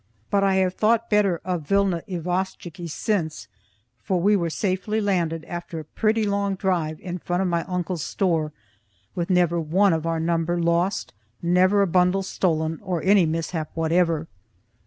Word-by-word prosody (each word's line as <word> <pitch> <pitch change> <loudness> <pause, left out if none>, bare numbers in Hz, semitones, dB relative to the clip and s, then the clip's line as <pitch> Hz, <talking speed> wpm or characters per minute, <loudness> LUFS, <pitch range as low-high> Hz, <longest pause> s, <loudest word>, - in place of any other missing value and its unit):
But 200 -1 +3
I 195 -1 +3
have 185 -1 +2
thought 230 +3 +1
better 200 -5 +3
of 175 -5 -3
Vilna 195 -3 +2
Isvostchiky 175 -1 -3
since, 160 -2 -2 0.5
for 185 -2 0
we 205 +4 +4
were 170 -4 0
safely 190 +4 -1
landed 170 -6 0
after 175 -1 -6
a - - -6
pretty 220 +7 0
long 200 -1 0
drive 170 -5 -1
in 180 0 -5
front 175 +3 -1
of - - 0
my 170 -1 0
uncle's 180 -3 -3
store, 165 -5 0 0.6
with 170 0 -3
never 175 -2 +2
one 185 +5 +3
of 160 0 -1
our 165 -1 0
number 170 +1 0
lost, 170 +3 0 0.3
never 185 +4 +4
a - - +1
bundle 180 +2 +2
stolen 160 -4 -1
or 180 -5 -3
any 190 -3 +5
mishap 160 0 -2
whatever. 165 -1 +1
180 Hz, 160 wpm, -24 LUFS, 165-195 Hz, 0.6 s, any